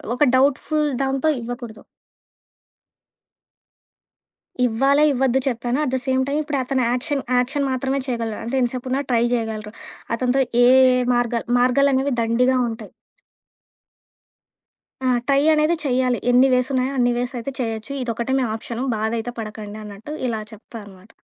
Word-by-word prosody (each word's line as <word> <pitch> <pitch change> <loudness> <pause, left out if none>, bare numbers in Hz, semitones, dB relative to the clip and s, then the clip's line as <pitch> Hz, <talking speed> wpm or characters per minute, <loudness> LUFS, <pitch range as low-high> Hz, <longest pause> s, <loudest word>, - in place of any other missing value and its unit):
ఒక 275 - +2
డౌట్‌ఫుల్ 290 +3 +2 0.2
దాంతో 270 +2 0
ఇవ్వకూడదు. 235 -2 -7 2.8
ఇవ్వాలా, 270 +5 +3
ఇవ్వద్దు 265 0 +1
చెప్పాను. 245 0 -1
అట్ 260 - -1
ద - - +2
సేమ్ 260 -1 +1
టైమ్ 285 +2 0
ఇప్పుడు 295 -1 -2
అతను 260 0 0
యాక్షన్ 275 +3 -1 0.2
యాక్షన్ 275 +3 0
మాత్రమే 265 +1 -1
చేయగలడు. 230 -3 -3
అంటే 235 +4 -3
ఎంతసేపున్నా 255 +2 -1
ట్రై 235 -1 +2
చేయగలరు. 220 -2 -3 0.4
అతనితో 255 +3 +1 0.2
ఏ, - - +7 0.3
ఏ - - +1
మార్గాలు 240 -1 0
మార్గాలనేవి 270 +2 +2
దండిగా 250 +3 +2
ఉంటాయి. 225 -2 -8 2.1
ఆ! - - +1 0.2
ట్రై 275 0 +3
అనేది 305 +2 +2
చెయ్యాలి. 250 -1 +1
ఎన్ని 255 +2 +5
వేసున్నాయో 255 +1 +1
అన్ని 245 -1 +3
వేస్ 245 +2 -2
అయితే 240 +4 -4
చేయొచ్చు. 225 +1 -3
ఇదొక్కటే 235 +1 -2
మీ - - +1
ఆప్షను 230 +3 -5
బాధైతే 225 +2 -2
పడకండి 215 -1 -7
అన్నట్టు 210 +8 -9
ఇలా 225 -2 -2
చెప్తా 220 +2 -12
అనమాట. 190 +2 -16
250 Hz, 135 wpm, -21 LUFS, 230-270 Hz, 2.8 s, ఏ